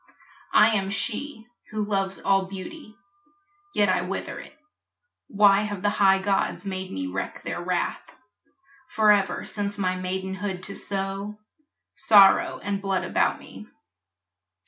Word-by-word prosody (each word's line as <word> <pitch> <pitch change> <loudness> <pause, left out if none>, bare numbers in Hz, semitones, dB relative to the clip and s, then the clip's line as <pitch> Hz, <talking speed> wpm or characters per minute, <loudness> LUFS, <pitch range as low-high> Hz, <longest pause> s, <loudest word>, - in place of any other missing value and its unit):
I - - +7
am 195 -3 0
she 225 +4 -4 0.2
Who 215 -1 -2
loves 195 -2 -1
all 195 -1 +1
beauty 215 - -9 0.8
yet 205 - +4
I 185 -1 +2
wither 180 +2 -5
it. - - -13 0.7
Why 200 -1 +4
have 205 -3 -4
the 205 - +2
high 195 -2 +4
gods 195 +1 -1
made 190 -1 -4
me 95 -1 -4
wreak 95 +1 -5
their 175 - -4
wrath 180 0 -2 0.9
Forever 210 -3 +2
since 205 0 -4
my 185 -2 0
maidenhood 190 +1 -4
to 200 - -4
sow 195 +1 -4 0.6
Sorrow 200 -3 +5
and 200 0 -2
blood 195 -1 -1
about - - +1
me? - - -12
195 Hz, 130 wpm, -25 LUFS, 190-205 Hz, 0.9 s, I